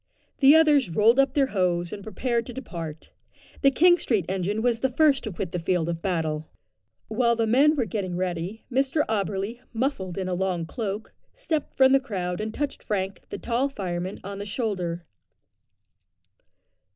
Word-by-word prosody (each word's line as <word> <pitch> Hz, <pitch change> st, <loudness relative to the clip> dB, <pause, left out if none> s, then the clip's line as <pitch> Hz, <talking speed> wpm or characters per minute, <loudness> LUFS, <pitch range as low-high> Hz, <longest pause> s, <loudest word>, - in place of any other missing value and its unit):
The 280 Hz, +2 st, +8 dB
others 295 Hz, -, +5 dB
rolled 220 Hz, +9 st, +4 dB
up 275 Hz, -, +3 dB
their 280 Hz, -2 st, +4 dB
hose, 175 Hz, -2 st, 0 dB
and 205 Hz, -, -6 dB
prepared 235 Hz, +3 st, -2 dB
to 245 Hz, -, -7 dB
depart. 165 Hz, -, -7 dB, 0.5 s
The 275 Hz, -, +6 dB
King 350 Hz, +6 st, +5 dB
Street 210 Hz, -8 st, 0 dB
engine 195 Hz, +4 st, -1 dB
was 240 Hz, -2 st, +2 dB
the 265 Hz, -, +1 dB
first 275 Hz, +1 st, +3 dB
to 215 Hz, -, -3 dB
quit 180 Hz, -1 st, -4 dB
the 180 Hz, -, -2 dB
field 170 Hz, -1 st, 0 dB
of 165 Hz, -1 st, -3 dB
battle. 160 Hz, -4 st, -2 dB, 0.6 s
While 235 Hz, +1 st, +2 dB
the 230 Hz, 0 st, +1 dB
men 275 Hz, +7 st, +4 dB
were 255 Hz, -5 st, 0 dB
getting 185 Hz, -3 st, -3 dB
ready, 180 Hz, +3 st, -3 dB
Mr 270 Hz, +4 st, +1 dB
Auberly, 205 Hz, +2 st, -2 dB
muffled 225 Hz, -7 st, -2 dB
in 190 Hz, -1 st, -2 dB
a 185 Hz, -, -1 dB
long 180 Hz, -2 st, -1 dB
cloak, 210 Hz, +3 st, -5 dB, 0.2 s
stepped 325 Hz, -, -3 dB
from 265 Hz, 0 st, +6 dB
the 270 Hz, -, +6 dB
crowd 185 Hz, -8 st, -3 dB
and 215 Hz, 0 st, -3 dB
touched 285 Hz, +4 st, -3 dB
Frank, 195 Hz, -2 st, -3 dB
the -, -, -5 dB
tall 245 Hz, +4 st, 0 dB
fireman, 185 Hz, -5 st, -4 dB
on 200 Hz, +1 st, -6 dB
the 205 Hz, -, -5 dB
shoulder. 185 Hz, -6 st, -2 dB
210 Hz, 175 wpm, -25 LUFS, 180-260 Hz, 0.6 s, The